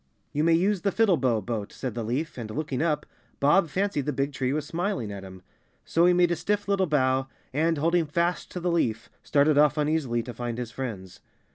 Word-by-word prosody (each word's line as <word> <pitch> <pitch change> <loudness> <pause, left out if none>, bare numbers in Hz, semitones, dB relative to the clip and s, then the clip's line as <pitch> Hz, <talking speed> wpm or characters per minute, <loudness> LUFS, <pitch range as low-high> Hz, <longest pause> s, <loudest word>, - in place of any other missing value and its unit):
"You 150 - +1
may 165 +1 +4
use 190 +2 +1
the 200 - +1
Fiddlebow 140 - +2
Boat," 110 -3 -3
said 130 -4 -5
the 115 - -3
leaf 130 +8 -2
and, 115 -3 -6
looking 135 +2 -3
up, 150 -2 0 0.3
Bob 155 +5 +4
fancied 185 -4 -1
the - - +2
big 140 0 -1
tree 130 -1 -1
was 150 +1 -1
smiling 170 - -2
at 100 -1 -6
him. 95 -1 -11 0.4
So 170 +2 +3
he - - +6
made 175 -1 +3
a - - +2
stiff 205 +4 -1
little 195 -2 +2
bow 130 -3 +2 0.3
and, 160 +3 +1
holding 165 +2 +2
fast 170 +4 -1
to 180 - -3
the 175 0 0
leaf, 115 -10 -1
started 145 0 +3
off 150 0 +4
uneasily 150 -6 0
to 120 +1 -7
find 120 -1 -4
his 120 -2 -5
friends. 105 -8 -6
150 Hz, 215 wpm, -26 LUFS, 125-170 Hz, 0.4 s, he